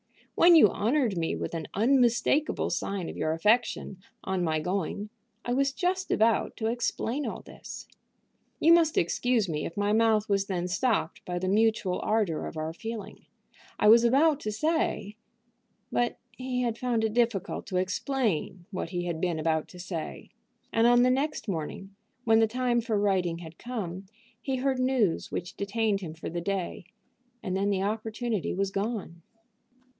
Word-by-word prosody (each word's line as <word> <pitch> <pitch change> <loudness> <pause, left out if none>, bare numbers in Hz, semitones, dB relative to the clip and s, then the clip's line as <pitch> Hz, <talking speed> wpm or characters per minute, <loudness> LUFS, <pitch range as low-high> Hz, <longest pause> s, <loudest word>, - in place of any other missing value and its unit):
When 345 0 +7
you 300 -11 +7
honored 235 -1 +1
me 165 -1 -1
with - - -4
an 160 -3 -4
unmistakable 245 +5 +2
sign 195 -4 -2
of - - -6
your 155 - 0
affection, 205 +1 +1 0.2
on 190 -1 -1
my 160 -2 +1
going, 195 +4 -3 0.4
I 245 - 0
was 275 +2 +2
just 370 +4 -1
about 225 0 +2
to 220 - -3
explain 240 +3 -1
all - - -5
this. - - -10 0.7
You 330 +2 +6
must 330 -2 +4
excuse 225 +5 +1
me 150 -3 -2
if 165 - -11
my 205 +1 +1
mouth 220 -1 +3
was 195 -1 +1
then 180 -2 -2
stopped 200 -3 0
by 180 0 -3
the 185 +1 -2
mutual 215 -2 +2
ardor 210 -8 0
of - - -8
our 155 +1 -3
feeling. 225 +4 -7 0.5
I - - +3
was 230 +2 +8
about 280 +5 +4
to 215 - -3
say 220 -5 -1 0.4
" - - -46
But 240 0 0 0.2
he 255 -1 -2
had 235 -1 -2
found 240 -3 0
it 220 -1 0
difficult 230 -5 0
to 185 - -2
explain 185 - -1
what 185 -3 -4
he 175 0 -3
had 170 -2 -3
been 175 -3 0
about 160 0 0
to 180 - -13
say, 175 -3 -6 0.4
and 225 +1 +4
on 245 0 +6
the 255 - +4
next 275 +1 -1
morning, 195 +2 -5 0.3
when 225 -1 +4
the 225 - +4
time 245 +1 0
for 225 -2 -1
writing 185 -4 +1
had 165 -1 -11
come, 195 -6 -5 0.3
he 270 -2 -2
heard 260 0 0
news 255 -9 +1
which 175 0 -5
detained 205 0 0
him 160 -4 -6
for 165 - -6
the 170 0 -3
day, 195 +1 -3 0.6
and 185 - -2
then 200 +1 +1
the 195 -1 0
opportunity 220 0 -2
was 195 +1 -1
gone. 195 -4 -3
210 Hz, 175 wpm, -28 LUFS, 180-240 Hz, 0.7 s, was